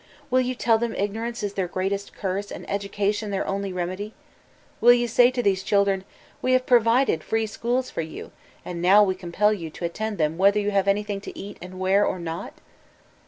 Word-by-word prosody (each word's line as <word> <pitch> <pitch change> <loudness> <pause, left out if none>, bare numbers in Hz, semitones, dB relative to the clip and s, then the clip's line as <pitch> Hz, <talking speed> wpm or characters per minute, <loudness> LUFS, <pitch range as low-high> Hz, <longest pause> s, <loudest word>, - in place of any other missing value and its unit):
Will 255 0 +4
you 255 0 -2
tell 230 -2 +2
them 235 0 -2
ignorance 225 +3 -3
is 205 -1 -2
their 190 -3 -1
greatest 195 +3 -3
curse 195 +1 -3
and - - -8
education 205 +1 -1
their 195 -1 -1
only 195 0 -2
remedy? 185 +4 -4 0.6
Will 240 +1 +7
you 240 0 +1
say 245 +1 +5
to 250 -1 -2
these 195 -3 +2
children, 195 -1 +1 0.4
"We 255 - +2
have 255 0 +3
pro 245 -1 +6
vided 230 -6 +2
free 225 +6 -1
schools 240 +4 -2
for - - -2
you, 160 0 -8 0.3
and 170 -1 -5
now 195 +4 +6
we 190 -2 +1
compd 190 +3 0
yon 165 -1 -6
to 170 - -6
attend 210 +5 -3
them 155 +1 0
whether 200 +2 +5
you 205 0 -1
have 195 -1 +1
anything 205 0 0
to - - -9
eat 200 +1 -8
and 185 +1 -9
wear 190 +2 +3
or 185 - 0
not"? 170 +1 -6
200 Hz, 210 wpm, -24 LUFS, 185-225 Hz, 0.6 s, Will